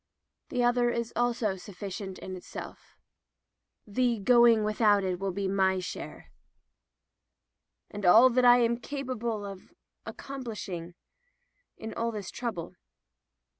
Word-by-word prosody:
The 250 -2 0
other 240 0 +3
is 235 -1 -3
also 235 -5 0
sufficient 190 0 -7
in 185 - -7
itself. 180 - -10 0.9
The 240 +3 0
going 235 +1 +5
without 210 -1 +3
it 185 -2 -2
will 195 0 -2
be 195 +1 -2
my 190 -1 +2
share 185 - -7 0.8
— - - -40
^and 205 0 -6
all 225 +8 +7
that 250 +1 +2
Fm 245 -1 +5
capable 240 -7 -4
of 195 - -10 0.4
accomplishing 210 -10 -7 0.4
— - - -47
in 220 - -7 0.2
this 205 -4 -6
trouble." 220 -9 -5
215 Hz, 120 wpm, -29 LUFS, 195-240 Hz, 0.9 s, all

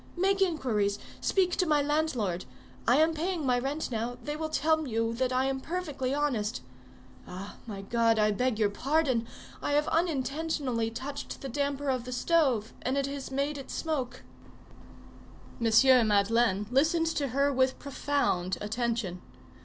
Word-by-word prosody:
Make 390 +2 +2
inquiries, 235 - +1 0.2
speak 365 -2 +2
to 365 - +2
my 300 -1 +4
landlord; 285 - 0 0.4
I 245 - +6
am 320 +2 +4
paying 330 0 -2
my 250 -1 +3
rent 275 +3 -3
now; 235 +2 -2
they 295 +3 -3
will 315 0 -3
tell 315 0 +1
you 230 -1 0
that 255 +2 0
I 255 +1 +2
am 270 0 -1
perfectly 295 -7 -3
honest. 255 -7 -1 0.6
Ah! 190 +3 -8
my 200 -3 -6
God! 230 +1 +2
I 215 0 +3
beg 250 +2 0
your 210 -2 +2
pardon; 265 -1 +1 0.3
I 290 - -1
have 295 +1 +2
unintentionally 290 -6 0
touched 265 +5 -6
the 270 - -5
damper 280 +1 -1
of 255 -2 -2
the 250 - -6
stove, 255 -5 +1
and 260 +2 -1
it 275 - +1
has 275 0 -5
made 280 +2 -1
it 270 - -10
smoke." 260 -6 -3 1.4
M. 235 +1 +6
Madeleine 210 0 +2
listened 320 +5 +3
to 320 -3 0
her 280 +3 +1
with 260 0 +2
profound 275 -10 -1
attention. 220 -4 -2
265 Hz, 155 wpm, -29 LUFS, 230-295 Hz, 1.4 s, I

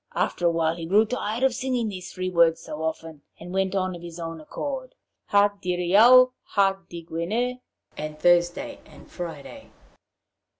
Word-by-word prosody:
After 175 - 0
a - - +5
while 165 -1 0
he 165 -1 -6
grew 210 +5 +4
tired 230 0 -3
of 265 -2 +3
singing 250 -2 -1
these 185 -3 -7
three 185 0 -4
words 165 -2 +4
so 155 -1 -7
often, 160 -1 -4 0.2
and 175 +2 -9
went 190 0 0
on 185 -1 -1
of 170 - -10
his 170 0 -9
own 165 -1 -6
accord: 260 - -6 0.3
'Ha 205 0 +4
Diriaou, 205 +9 +5
ha 195 -1 +1
Digwener,' 175 +9 -3 0.4
(And 150 0 -6
Thursday 175 - +2
and - - -16
Friday!) 175 - -8
180 Hz, 160 wpm, -25 LUFS, 165-225 Hz, 0.4 s, a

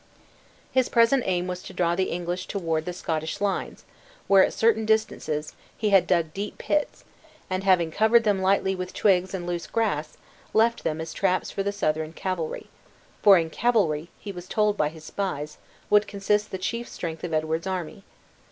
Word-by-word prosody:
His 260 -1 +2
present 235 +3 +4
aim 180 -1 0
was 180 0 -4
to - - -10
draw 170 -1 +1
the 185 +1 0
English 175 +1 -3
toward 165 -5 -2
the 180 - -3
Scottish 160 -3 -3
lines, 200 -1 -2 0.4
where, 195 -1 +6
at - - +1
certain 225 -1 +2
distances, 215 -9 -1 0.2
he 215 -1 0
had 190 -3 +5
dug 170 -4 +1
deep 205 +1 -5
pits; 300 -1 -1 0.5
and 185 +1 -1
having 180 -4 +3
covered 220 +5 +4
them 205 -3 +1
lightly 190 0 +2
with 185 -1 -6
twigs 190 -2 +2
and 175 -2 -5
loose 175 -1 -3
grass, 180 -10 -1 0.4
left 230 +2 +3
them 155 +1 -1
as 160 0 -6
traps 185 -2 0
for 195 - -2
the 200 +1 -1
Southron 155 -5 -1
cavalry; 175 -3 -3 0.6
for 200 -2 +8
in 165 -1 -1
cavalry, 175 -10 +1
he 205 - -7
was 180 -1 -9
told 210 0 +1
by 150 -6 +1
his 160 0 -13
spies, 155 -4 -4 0.3
would 210 0 +5
consist 210 +1 0
the 190 - -4
chief 230 +5 -3
strength 165 -2 -6
of 175 - -3
Edward's 160 +2 -1
army. 185 +1 -4
185 Hz, 180 wpm, -25 LUFS, 165-205 Hz, 0.6 s, for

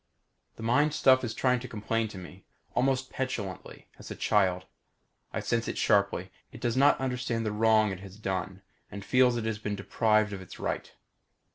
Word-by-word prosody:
The - - -9
mind 145 +6 +2
stuff 130 -3 +5
is 110 -2 -3
trying 125 -1 +2
to 130 - -7
complain 115 0 -1
to 105 - -10
me. 90 +1 -11 0.3
Almost 130 +1 +1
petulantly; 105 -8 -5
as - - -10
a - - -5
child. 95 -3 +1 0.7
I - - -3
sense 115 0 -1
it - - -3
sharply. 100 -2 +2 0.2
It - - -11
does 120 -1 -1
not 140 +2 +5
understand 125 -3 -2
the 105 - 0
wrong 110 0 +3
it 95 - -5
has 95 0 -11
done 95 -1 -4 0.3
and 100 -1 -8
feels 125 -1 +4
it 115 - -3
has 110 -2 -2
been 105 -1 -3
deprived 105 +1 +1
of 95 - -6
its 95 - -11
right. - - -3
110 Hz, 185 wpm, -29 LUFS, 100-125 Hz, 0.7 s, stuff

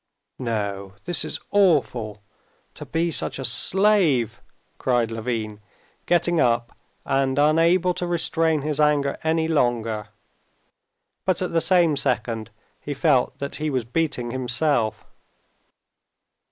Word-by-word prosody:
"No; 100 -5 -3
this 175 -2 0
is - - -5
awful! 125 - +1 0.5
To - - -10
be 165 +1 -1
such - - -1
a 135 - -5
slave!" 150 - +3 0.4
cried 120 -3 +1
Levin, 110 -2 -4 0.5
getting 175 -1 +2
up, 120 -2 +1 0.3
and 135 -1 0
unable 165 +5 +3
to 180 0 -4
restrain 165 -3 +1
his 150 -1 -2
anger 145 -2 +2
any 160 0 +1
longer. 115 -8 0 1.2
But 185 0 0
at 180 - -4
the 165 - +3
same 175 -4 +3
second 120 -5 -2 0.3
he 145 - -5
felt 135 -4 +2
that 140 0 -5
he 155 0 -2
was 130 -5 -1
beating 125 -3 -2
himself. 130 -2 0
140 Hz, 120 wpm, -23 LUFS, 120-165 Hz, 1.2 s, slave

